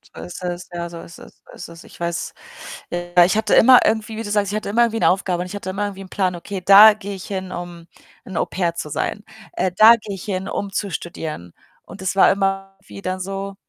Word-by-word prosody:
So - - -8
ist 180 - -9
es. 175 0 -5
Ja, 170 0 -4
so 170 -1 -9
ist 170 - -13
es, - - -14
so - - -16
ist 180 - -9
es. 170 0 -13
Ich - - -17
weiß. 170 0 -3 0.6
Ja, 175 0 +3
ich 185 - 0
hatte 215 -1 +2
immer 255 +1 +8
irgendwie 220 0 -1
wie 225 - -4
du 205 - -6
sagst, 205 -1 0
ich - - -3
hatte 215 -1 -3
immer 230 +4 +2
irgendwie 225 -1 -1
'ne - - +4
Aufgabe 180 -1 -1
und 180 - -4
ich 190 - -8
hatte 200 -2 -6
immer 200 +2 -3
irgendwie 195 -1 -7
'n 185 - -14
Plan: 185 -2 -1
„Okay, 185 +3 -7
da 200 +4 +9
gehe 205 -1 -7
ich 190 - -9
hin, 190 -2 -5
um 175 -1 -8 0.4
'n 190 - -7
Au-pair 170 -2 -1
zu - - -5
sein. - - -3 0.3
Äh, 185 - -1
da 220 +4 +8
gehe 205 -2 -7
ich 190 - -10
hin, 190 -2 -4
um 200 -1 -4
zu 200 0 -3
studieren“ 155 - -6 0.3
und 190 - -12
es 190 0 -2
war 195 - +6
immer 195 0 -2
wie 200 - -11
dann 185 -1 -3
so 195 +1 -5
190 Hz, 255 wpm, -20 LUFS, 175-205 Hz, 0.6 s, da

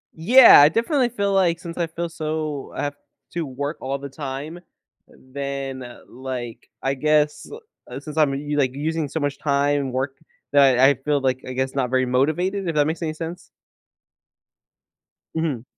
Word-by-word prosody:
Yeah, 230 - +8
I 145 - +7
definitely 240 - +1
feel 200 -4 -1
like, 175 -3 +2
since 170 -1 -8
I 170 -1 0
feel 170 +1 -4
so 155 -3 -4
I - - -3
have 145 0 -3 0.4
to 170 -2 -2
work 140 +3 -4
all 135 +1 -2
the 140 0 -8
time, 145 +4 -6 0.5
then, 135 0 -6 0.2
like, 125 -2 -7
I 135 - +1
guess, 150 +1 +1 0.4
uh, - - -6
since 150 0 -9
I'm 150 -3 +3
u 145 +1 -3
like, 130 -2 +1
using 155 +2 -2
so 160 - -3
much 145 -1 -2
time, 145 0 +1
and 130 -2 -4
working, 135 +4 -4 0.3
that 140 -3 +5
I 135 +3 +6
feel, 145 +2 -1
like, 130 -1 0
I 130 - -5
guess 130 +1 -2
not 130 -3 -1
very 130 0 +2
motivated, 165 +10 0
if 165 - -2
that 145 -1 +3
makes 160 +2 -3
any 160 -2 -2
sense. 165 +2 -7 1.9
Mhm. 155 -8 -2
145 Hz, 175 wpm, -22 LUFS, 135-160 Hz, 1.9 s, Yeah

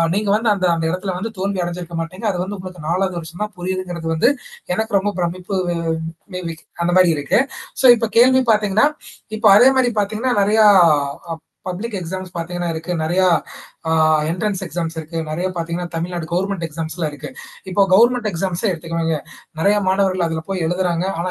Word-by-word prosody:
நீங்க 205 -1 0
வந்து 220 0 +2
அந்த 185 -1 -1
அந்த 165 -1 -2
இடத்தல 185 0 -3
வந்து 225 +4 -4
தோல்வி 195 -1 -1
அடைஞ்சிருக்க 175 -1 -5
மாட்டீங்க. 185 +7 -5
அது 180 - -3
வந்து 200 +1 -5
உங்களுக்கு 180 -4 -9
4வது 185 0 0
வருஷம் 170 +5 -6
தான் 210 - -13
புரியுதுங்கிறது, 180 -2 -4
வந்து 245 - +4 0.4
எனக்கு 220 -2 +1
ரொம்ப 205 +1 -2
பிரமிப்பு 180 +3 -3 0.8
மே 180 - -4
பி 165 - -5 0.3
அந்த 175 - +1
மாரி 180 -2 +6
இருக்கு. 145 - +2 0.4
சோ - - +6
இப்ப 230 - -1
கேள்வி 260 +2 +6
பார்த்தீங்கன்னா, 210 +6 +3 0.5
இப்ப 220 - 0
அதே 255 +4 +7
மாரி 245 -2 +3
பார்த்தீங்கன்னா, 220 +5 -1
நெறையா 215 +1 +4 0.6
ஆ - - -1 0.4
பப்ளிக் 205 +5 -4
எக்ஸாம்ஸ் 185 +1 -6
பார்த்தீங்கன்னா 175 0 -3
இருக்கு. 165 +2 -4
நெறைய 175 +4 +1 0.7
அ - - +2 0.4
என்ட்ரன்ஸ் 195 +2 -2
எக்ஸாம்ஸ் 165 0 -4
இருக்கு. 160 +1 -5
நெறைய 170 +4 -2
பார்த்தீங்கன்னா, 170 +1 -3
தமிழ்நாடு 170 0 -3
கவர்ன்மெண்ட் 190 -1 -1
எக்ஸாம்ஸ்லாம் 160 0 -4
இருக்கு. 145 0 -8 0.4
இப்போ 200 - 0
கவர்ன்மென்ட் 240 +3 +4
எக்ஸாம்ஸே 185 +3 -1
எடுத்துக்குவாங்க. 165 -1 -2 0.4
நெறைய 200 +5 +3
மாணவர்கள் 190 -2 +2
அதுல 160 -1 -2
போய் 190 -3 -2
எழுதுறாங்க. 180 0 0 0.2
ஆனா, 180 +1 -2
180 Hz, 170 wpm, -19 LUFS, 170-205 Hz, 0.8 s, அதே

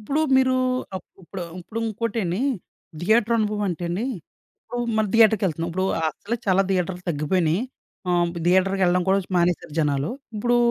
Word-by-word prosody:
ఇప్పుడు 280 +9 -1 0.2
మీరు 260 0 +4 0.4
అప్ 180 - -8 0.2
ఇప్పుడు 185 +2 -7 0.2
ఇప్పుడు 215 +6 -6
ఇంకోటేండి. 215 -4 -2 0.6
థియేటర్ 220 +5 +3
అనుభవం 210 -1 0
అంటే 175 -1 -3
అండి, 180 +7 -2 0.6
ఇప్పుడు 245 - -6 0.2
మనం 215 -2 +2
థియేటర్‌కి 220 -2 +5
యేళ్తున్నాం. 165 0 -2
ఇప్పుడు 185 +2 -1 0.2
అసలే 200 +9 -3
చాలా 190 0 +4
థియేటర్లు 180 -1 -1
తగ్గిపోయినాయి. 165 +3 +1 0.5
ఆహ్, 175 -1 +2 0.2
థియేటర్‌కి 190 +2 +3
వెళ్ళడం 180 +1 +3
కూడా 195 - +4
చు - - -21
మానేశారు 175 -3 +1
జనాలు. 145 -1 0 0.3
ఇప్పుడు 240 +3 +2
190 Hz, 150 wpm, -24 LUFS, 175-220 Hz, 0.6 s, థియేటర్‌కి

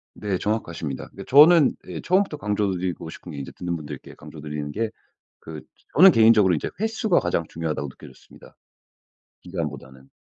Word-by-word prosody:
네 100 -3 -2
정확하십니다. 85 -10 -4
그니까 - - -11
저는 150 +2 +6
예 - - -6
처음부터 185 -3 +1
강조 105 -4 -1
드리고 90 -2 -4
싶은 85 - -10
게 70 - -8
인제 70 - -7
듣는 90 -1 -4
분들께 75 -3 -10
강조 80 - -12
드리는 75 -1 -5
게 110 +4 -2 0.6
그 80 -1 -7 0.4
저는 190 +3 +9
개인적으로 110 -4 +5
이제 - - -3
횟수가 220 -3 +1
가장 85 -1 -1
중요하다고 75 -4 -4
느껴졌습니다 65 - -16 0.9
기간보다는. 70 -7 -7
90 Hz, 405 characters per minute, -23 LUFS, 75-115 Hz, 0.9 s, 저는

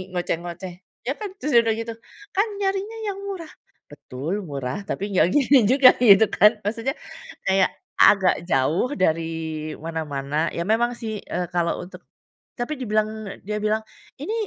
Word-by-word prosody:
ngoceh-ngoceh, 175 +1 -3 0.3
ya 270 - +1
kan? 420 -2 -4
Terus 300 - -1
udah 225 -1 +1
gitu, 230 0 -4 0.4
"Kan 405 +4 +3
nyarinya 395 +3 -1
yang 395 -1 -3
murah." 370 -5 -6 0.4
Betul 150 +8 -5
murah, 140 +3 -4
tapi 200 0 -3
nggak 170 - +5
gini 280 -1 +5
juga 260 -1 +8
gitu 220 -3 +7
kan, 210 +1 +5
maksudnya 230 +5 -1 0.6
kayak 190 -1 +3 0.3
agak 190 -4 +5
jauh 155 - +1
dari 160 -3 -1
mana-mana. 155 -1 -2
Ya, 170 - -2
memang 240 +2 +2
sih, 220 -3 -5
eee, 180 - -3
kalau 170 -1 0
untuk 180 - -12 0.6
tapi 240 +6 -2
dibilang 215 -2 -2
dia 210 0 -2
bilang, 215 +1 +1 0.4
"Ini 325 +10 -4
205 Hz, 145 wpm, -23 LUFS, 165-245 Hz, 0.6 s, juga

